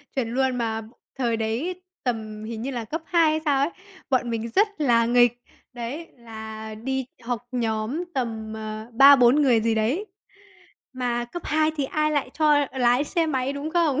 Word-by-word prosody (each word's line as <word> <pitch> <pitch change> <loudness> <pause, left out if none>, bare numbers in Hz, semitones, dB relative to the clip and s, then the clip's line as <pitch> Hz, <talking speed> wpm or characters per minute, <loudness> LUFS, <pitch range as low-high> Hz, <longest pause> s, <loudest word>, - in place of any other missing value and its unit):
chuẩn 235 -4 -1
luôn! 260 0 +1
Mà 225 -2 -1 0.4
thời 235 -3 0
đấy 250 +12 -2 0.2
tầm 215 -3 -3
hình 225 0 -5
như 270 +3 -3
là 235 -3 -4
cấp 315 +8 -4
2 330 -3 +3
hay 310 - 0
sao 285 -3 +3
ấy, 285 - +2 0.4
bọn 255 -3 +1
mình 230 0 -3
rất 415 +3 +5
là 235 -5 +4
nghịch, 240 0 +3 0.3
đấy, 250 +7 -5
là 220 -2 -8
đi 265 +4 -3 0.2
học 245 0 -4
nhóm 230 +5 -1
tầm, 225 -4 -3
ờ, 215 0 -6
3-4 270 +1 +7
người 250 -5 +4
gì 225 0 +1
đấy, 245 - 0 0.9
mà 245 -2 -1
cấp 345 +8 -8
2 310 0 +2
thì 285 - 0
ai 305 +3 0
lại 285 -4 -1
cho 295 -2 +4
lái 250 +1 +3
xe 330 +1 0
máy, 270 -3 -1
đúng 285 +2 -4
không? 320 -5 +2
245 Hz, 180 wpm, -24 LUFS, 225-290 Hz, 0.9 s, 3-4